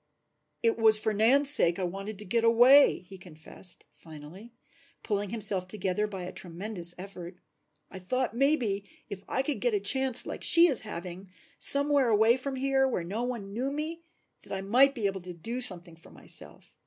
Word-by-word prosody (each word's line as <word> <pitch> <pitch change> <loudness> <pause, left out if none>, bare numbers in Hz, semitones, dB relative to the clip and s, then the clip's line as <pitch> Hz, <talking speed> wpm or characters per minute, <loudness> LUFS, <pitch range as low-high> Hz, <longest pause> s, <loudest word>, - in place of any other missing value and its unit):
"It 230 0 +1
was 220 -1 +6
for 215 0 -1
Nan's 265 +7 +5
sake 170 - +6
that 190 - -5
I - - 0
wanted 195 +4 -7
to 210 - -8
get 230 +4 -1
away," 245 +5 +5
he 190 0 -13
confessed 175 +1 -8
finally, 160 +8 -13 0.5
pulling 205 -2 -3
himself 200 -4 -1
together 195 +1 -2
by 190 -3 -8
a 180 - -7
tremendous 175 0 -5
effort. 180 -2 -10 0.6
"I 190 - -9
thought 255 +8 -3
maybe 240 -7 0 0.3
if 195 -1 -7
I 265 - -1
could 270 -5 -3
get 240 -3 0
a - - 0
chance 255 +5 +1
like - - -7
she 340 0 +7
is 280 -9 +1
having, 185 -2 -8 0.3
somewhere 280 -2 +3
away 220 +1 +3
from 265 +1 -5
here 270 0 0
where 235 -9 -3
no 200 +7 -5
one 235 -5 -5
knew 255 +5 -3
me, 310 +3 -5 0.4
that - - -15
I 190 - -4
might 255 +8 +3
be 225 -5 -4
able 195 -1 -2
to 180 0 -9
do 230 +9 -6
something 175 -7 -2
for 165 - -15
myself. - - -7
215 Hz, 190 wpm, -27 LUFS, 185-255 Hz, 0.6 s, she